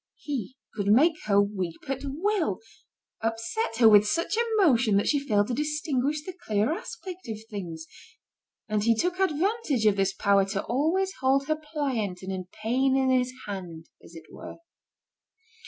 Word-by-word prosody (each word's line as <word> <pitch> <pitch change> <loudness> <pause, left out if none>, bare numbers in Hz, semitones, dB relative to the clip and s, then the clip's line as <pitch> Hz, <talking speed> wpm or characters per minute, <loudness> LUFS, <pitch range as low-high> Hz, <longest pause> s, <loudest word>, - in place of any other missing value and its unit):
He 260 -4 -5 0.2
could 200 -2 -3
make 275 +11 +5
her 200 -1 +4
weep 190 -5 -2
at 270 0 -3
will, 320 - -1 0.6
upset 225 - -2
her 230 -2 +6
with 210 -1 +7
such 335 - 0 0.2
emotion 245 - +4
that 200 - +1
she 290 - +3
failed 210 -6 +1
to - - -1
distinguish 300 0 -1
the 370 - -6
clear 220 - 0
aspect 365 0 -8
of 220 - -3
things; 170 -6 -6 0.8
and 210 -1 0
he 230 +1 +4
took 360 +9 -1
advantage 370 - 0
of 205 -2 +4
this 195 0 +2
power 200 0 +3
to 195 0 -3
always 335 +10 0
hold 270 +1 +2
her 310 +2 +1
pliant 275 - -3
and 190 - -4
in 185 -1 -4 0.2
pain 260 +4 +2
in 265 -1 +2
his 250 -1 +2
hand, 180 -5 -7
as 170 - -15
it 160 -1 -11
were. - - -9
250 Hz, 165 wpm, -27 LUFS, 205-300 Hz, 0.8 s, with